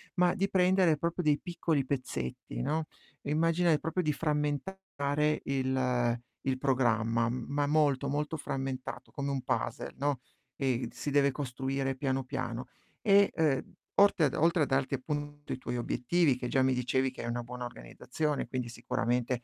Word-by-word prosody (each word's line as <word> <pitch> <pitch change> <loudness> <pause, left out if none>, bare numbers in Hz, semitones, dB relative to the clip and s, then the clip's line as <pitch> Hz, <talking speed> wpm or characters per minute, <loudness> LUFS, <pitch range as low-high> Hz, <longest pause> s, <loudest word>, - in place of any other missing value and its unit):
ma 180 0 +3
di 195 0 0
prendere 180 -4 +4
proprio 170 +2 -1
dei 150 -3 +3
piccoli 165 -5 0
pezzetti, 65 - -4
no, 160 - 0 0.4
immagina, 165 +4 +2
ehm, 155 - +5
proprio 165 +3 -1
di 155 -2 +1
frammentare 150 0 -1
il 130 -3 +1 0.3
il 130 -1 +1
programma, 115 -4 +2
ma 140 +4 -1
molto, 145 -2 +2
molto 150 +2 -1
frammentato, 135 -3 -4
come 140 0 -3
un 135 -1 -1
puzzle, - - -2
no, 140 -2 0 0.4
ehm, 130 -3 0
si - - -5
deve 140 0 +4
costruire 135 0 -2
piano, 135 0 -1
piano. 120 -1 -4 0.3
E, 200 -2 +5
ehm, 150 -4 +1 0.2
orte 200 -4 +6
a 140 - +3
d - - -11
oltre 165 +1 +3
a - - +3
darti 135 0 0
appunto 145 +2 -4
i - - -4
tuoi 125 -1 -4
obiettivi 130 +5 +2
che 125 -1 -4
già 135 - +3
mi 130 0 +3
dicevi 130 +1 +1
che - - -8
hai 120 - -3
una 120 0 -2
buona 125 +1 -6
organizzazione, 125 - -3
quindi 125 -2 -3
sicuramente, 120 +1 -1
140 Hz, 165 wpm, -31 LUFS, 125-155 Hz, 0.4 s, orte